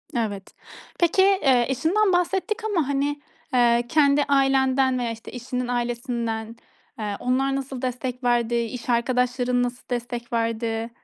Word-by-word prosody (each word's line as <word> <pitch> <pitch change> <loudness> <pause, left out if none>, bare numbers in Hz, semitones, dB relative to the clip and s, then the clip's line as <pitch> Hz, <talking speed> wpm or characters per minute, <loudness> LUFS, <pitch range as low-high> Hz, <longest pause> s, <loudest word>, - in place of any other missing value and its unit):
Evet, 205 -5 -3 0.5
peki, 345 +2 +3
eee, 295 -11 +4
eşinden 360 - +2
bahsettik 385 +5 0
ama, 350 -10 0
hani, 285 +1 -1 0.3
eee, 240 -1 +4
kendi 290 -1 +4
ailenden 270 -2 +2
veya 235 -2 -1
işte 225 0 -9
eşinin 250 0 -4
ailesinden, 235 -2 -3 0.4
eee, 210 -1 -3
onlar 270 +2 +1
nasıl 270 -1 -5
destek 250 0 -4
verdi, 240 -1 +2
iş 235 +1 -3
arkadaşların 245 +1 +1
nasıl 245 0 -5
destek 240 -1 -4
verdi? 230 0 -1
250 Hz, 130 wpm, -24 LUFS, 235-275 Hz, 0.5 s, eee